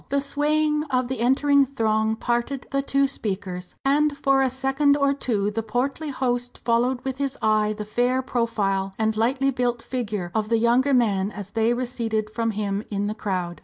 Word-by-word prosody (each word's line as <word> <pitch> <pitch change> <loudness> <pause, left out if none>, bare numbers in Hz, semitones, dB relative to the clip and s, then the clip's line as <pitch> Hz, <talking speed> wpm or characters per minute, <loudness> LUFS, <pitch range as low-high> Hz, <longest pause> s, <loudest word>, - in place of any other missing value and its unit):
The 280 - +1
swaying 300 +2 +1
of 255 -4 -1
the 260 - -3
entering 280 +4 +4
throng 220 -4 0
parted 240 +4 -2
the 275 0 +1
two 275 0 +2
speakers, 190 -7 -5
and 290 +1 +2
for 275 -1 +3
a 265 - +3
second 270 +2 +2
or 280 -1 +2
two 210 -7 -1
the 225 +2 -2
portly 260 +7 -2
host 245 -2 -2
followed 245 +2 +1
with 265 0 -4
his 275 -1 -2
eye 215 -1 +2
the 210 - -5
fair 245 +4 +1
profile 200 -6 -1
and 220 0 +1
lightly 260 +5 +1
built 245 -2 -1
figure 210 -8 -3
of 215 -1 -1
the 230 - +3
younger 245 +4 +3
man 200 -5 +2
as 205 -2 -8
they 225 +1 +2
receded 230 -4 -2
from 230 +1 -1
him 205 -1 -2
in 205 -1 -2
the 210 - -1
crowd. 185 -5 -3
240 Hz, 185 wpm, -24 LUFS, 215-270 Hz, -, entering